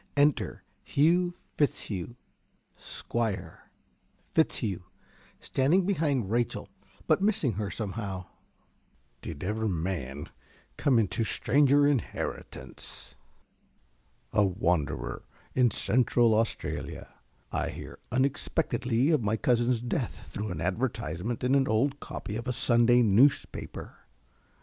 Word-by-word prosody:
_) - - -33
Enter 145 0 +2 0.2
Hugh 175 +4 +2 0.2
Fitzhugh, 120 - -1 0.6
Squire. 100 -8 -4 0.6
~Fitzhugh~ 110 - +1 0.6
(standing 160 +8 +2
behind 145 - 0
Rachel, 120 0 -1 0.4
but - - +3
missing 200 - +2
her 105 0 -3
somehow). 100 -3 -4 1.0
Did 80 -3 -6
ever 110 +3 -1
man 80 -6 -3 0.5
come 140 -5 +3
into 110 0 +1
stranger 145 +5 +4
inheritance? 115 - -4 1.2
A 105 -1 +4
wanderer 90 -5 0 0.3
in 125 -2 +4
Central 120 +1 +3
Australia, 115 +1 -2 0.4
I - - -1
hear - - -8
unexpectedly 130 -1 +1
of 150 -5 +3
my 110 +1 0
cousin's 120 0 +2
death 120 0 -3
through 105 +1 -4
an 85 -3 -4
advertisement 95 +1 -2
in 125 +1 +2
an 135 -1 +4
old 135 +6 +1
copy 105 - -5
of 115 +3 -6
a 125 - 0
Sunday 120 0 +5
newspaper. 115 +7 +2
115 Hz, 105 wpm, -29 LUFS, 100-135 Hz, 1.2 s, Sunday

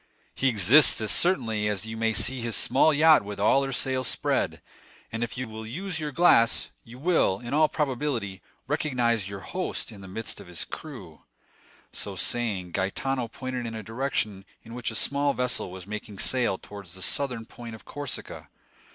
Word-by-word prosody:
"He 135 - 0
exists 120 - +6
as 110 - +1
certainly 110 - +2
as 105 -1 -1
that - - -7
you 110 - -5
may 110 0 +1
see 130 +3 0
his 115 -2 -1
small 135 +9 +5
yacht 155 -1 +6
with 100 0 -7
all 135 +7 +4
her 135 - -3
sails 130 -1 +1
spread; - - 0 0.5
and 115 +1 -2
if 120 - -4
you 130 0 -3
will 110 0 -8
use 165 - -4
your 150 -1 -3
glass, 130 -7 +4
you 115 +2 -13
will, 145 - +2
in 120 +3 -6
all 155 +1 +4
probability, 130 - -2 0.2
recognize 120 -8 0
your 100 -1 -7
host 185 - -3
in 100 -3 -11
the 95 - -10
midst 105 +4 -4
of - - -13
his 90 -2 -5
crew." - - -10 0.7
So 100 - -4
saying, 95 -3 0
Gaetano 120 +8 -1
pointed 125 0 -5
in 115 - -6
a 110 - -6
direction 110 -4 -2 0.2
in 115 - -11
which 120 -1 -3
a 110 - -6
small 140 +3 +2
vessel 125 -6 0
was 90 0 -9
making 105 0 -7
sail 120 -3 +1
towards 100 -4 -11
the 95 0 -7
southern 125 -5 0
point 115 0 -9
of 110 - -15
Corsica. 145 -4 -7
115 Hz, 185 wpm, -27 LUFS, 105-135 Hz, 0.7 s, exists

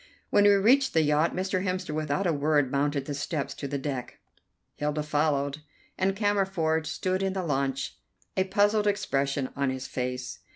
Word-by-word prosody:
When 205 0 +5
we - - +8
reached 260 +6 +4
the 160 - +5
yacht 150 +2 +2
Mr. 185 0 -1
Hemster 185 -4 -2
without 155 +4 -1
a 170 - +2
word 145 -2 +2
mounted 140 0 0
the 145 - -4
steps 140 -1 -3
to 140 - -6
the 140 +1 -2
deck. 135 -3 -4 0.6
Hilda 150 +1 -1
followed, 145 -1 0 0.4
and 190 +1 +1
Cammerford 190 -6 +1
stood 185 +4 -1
in 195 -1 0
the 190 -1 -2
launch, 135 -2 -1 0.4
a 190 - +2
puzzled 205 +2 +2
expression 140 -9 0
on 140 -1 0
his 130 0 -4
face. 125 0 -4
155 Hz, 170 wpm, -27 LUFS, 140-190 Hz, 0.6 s, we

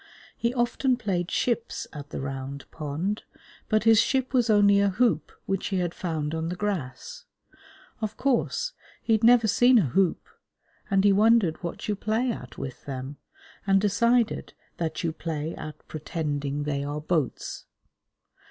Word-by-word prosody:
He 235 - 0
often 250 +1 +1
played 185 -6 -1
ships 235 -1 -1
at 145 -1 -8
the - - -5
Round 135 +1 -5
Pond, 160 +7 -3 0.5
but 215 -1 +3
his 225 -1 +6
ship 260 -1 0
was 245 -3 +3
only 200 -1 +5
a 200 0 +3
hoop 190 -6 +1
which 195 -1 -1
he 195 - -1
had 175 -2 -1
found 155 -4 -3
on 160 0 -2
the 180 - -3
grass. 205 - -4 0.8
Of 215 -1 -3
course, 275 - 0 0.3
he 225 - +2
had 220 +1 +2
never 235 -1 +6
seen 245 +3 +5
a 175 - +3
hoop, 185 +7 +1 0.6
and 195 -1 +3
he 200 -1 +5
wondered 210 -5 +4
what 170 -2 -5
you 210 - 0
play 220 +5 0
at 125 - -8
with 135 -2 -7
them, 135 +1 -6 0.5
and 195 0 +5
decided 235 +4 +1 0.2
that 160 -1 -3
you 165 - +1
play 160 -1 -4
at 155 - -9
pretending 145 -2 -3
they 140 -1 -2
are 145 +1 -3
boats. 155 -3 -2
190 Hz, 160 wpm, -26 LUFS, 150-225 Hz, 0.8 s, his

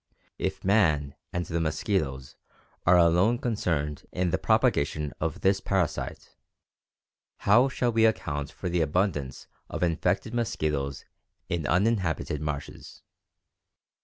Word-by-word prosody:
If - - -3
man 80 -9 +3 0.2
and 85 0 -2
the 85 0 -2
mosquitoes 75 -5 -2 0.5
are 90 +1 +7
alone 90 +7 +4
concerned 80 - -2
in 90 -1 0
the - - 0
propagation 75 0 +1
of 80 0 -3
this 95 0 +3
parasite, 95 -5 -2 1.1
how 120 +7 +5
shall 125 -2 0
we 115 0 +4
account 75 -9 -2
for 95 - -6
the 85 -1 +1
abundance 75 -4 -1 0.2
of - - -3
infected 85 +6 0
mosquitoes 75 - -2 0.4
in 85 -5 -1
uninhabited 90 - +1
marshes? 75 -1 -6
85 Hz, 115 wpm, -27 LUFS, 75-100 Hz, 1.1 s, are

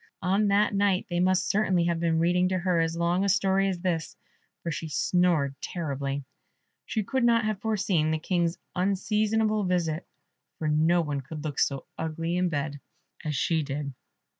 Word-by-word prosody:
On 195 +3 +2
that 205 +1 +3
night 200 -2 +2
they 175 - 0
must 185 +1 +2
certainly 190 -4 +2
have 170 -1 0
been 165 -1 +1
reading 180 +2 +3
to 185 - 0
her 180 -1 +1
as 165 0 0
long 170 +2 +1
a 200 - +1
story 195 -1 +3
as 180 -2 -3
this, 170 -4 -2 0.5
for 170 - -2
she 160 +1 -4
snored 165 -4 +2
terribly. 140 -4 -3 0.6
She 220 - -1
could 260 +5 -1
not 230 -2 +4
have 215 -2 -2
foreseen 200 -8 +1
the 160 - +1
King's 170 +1 0 0.2
unseasonable 210 +3 +1
visit, 175 -2 -1 0.5
for 155 - -2
no 160 +3 +3
one 145 -3 -2
could 150 +3 -8
look 150 -3 -3
so 135 -1 0
ugly 165 +1 -2
in 180 0 +1
bed 145 -2 -3 0.4
as 150 -2 -2
she 160 +4 +1
did. 140 -1 -4
175 Hz, 175 wpm, -27 LUFS, 155-195 Hz, 0.6 s, not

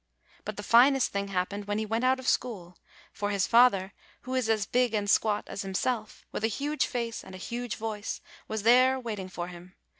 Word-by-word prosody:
But 215 -1 -5
the 205 - -5
finest 255 +5 +5
thing 200 0 -2
hap 185 -2 -1
pened 205 0 -6
when 205 0 -1
he 220 - -1
went 225 +3 -1
out 260 +1 +3
of 260 0 -8
school; 185 -8 -1 0.4
for 205 - -2
his 200 -2 +1
father, 215 -5 +4 0.3
who 255 - -6
is 255 -3 0
as 215 -2 +2
big 245 -1 +1
and 205 -1 -1
squat 210 +1 +2
as - - -6
himself, 215 +4 -3
with - - -4
a - - +4
huge 285 +7 -1
face 235 -2 -3
and 190 - -11
a - - -7
huge 240 +4 -4
voice, 215 -1 -4 0.3
was 220 -1 -3
there 255 +3 +5
waiting 210 -6 -5
for 175 -1 -5
him. 180 +1 -12
220 Hz, 215 wpm, -28 LUFS, 200-245 Hz, 0.4 s, finest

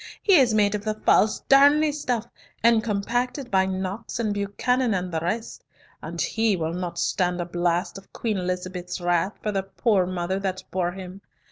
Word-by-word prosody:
He 400 - +4
is 255 -5 +5
made 205 -1 +3
of 210 -1 -3
the 215 0 -2
false 215 0 +3
Darnley 290 +3 +5
stuff, 250 -6 -2 0.4
and 230 -1 +5
compacted 245 +5 -2
by 190 -1 +3
Knox 190 +3 -4
and 220 -3 0
Buchanan 220 +4 0
and 180 0 -3
the 165 - -1
rest, 215 +8 -4 0.4
and - - -7
he 220 -2 +1
will 165 -2 -2
not 175 -1 -4
stand 180 0 0
a 175 - -2
blast 175 +2 -1
of 195 - -22
Queen 215 -4 -2
Elizabeth's 180 0 -4
wrath 175 +2 0
for 210 - 0
the 195 -1 0
poor 195 0 +1
mother 185 +1 -2
that 190 -1 -3
bore 175 -1 -1
him. 190 +1 -9
195 Hz, 180 wpm, -24 LUFS, 180-225 Hz, 0.4 s, is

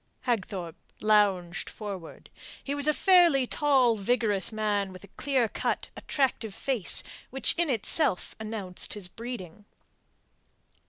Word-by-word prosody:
Hagthorpe 190 -8 -3 0.2
lounged 200 -5 +2
forward. 195 -6 -8 0.3
He 280 - -3
was 285 0 +3
a 305 - +4
fairly 345 -8 +5
tall, 260 -4 +3
vigorous 210 -1 +1
man 205 -3 -1
with 185 0 -12
a 200 - -14
clear 265 -5 0
cut, - - -3
attractive 250 -7 -1
face 255 -9 +2 0.3
which 270 +1 +2
in 340 -2 0
itself 240 - +1
announced 215 -5 -3
his 200 -3 -5
breeding. 210 -3 -8
220 Hz, 120 wpm, -28 LUFS, 195-265 Hz, 0.3 s, fairly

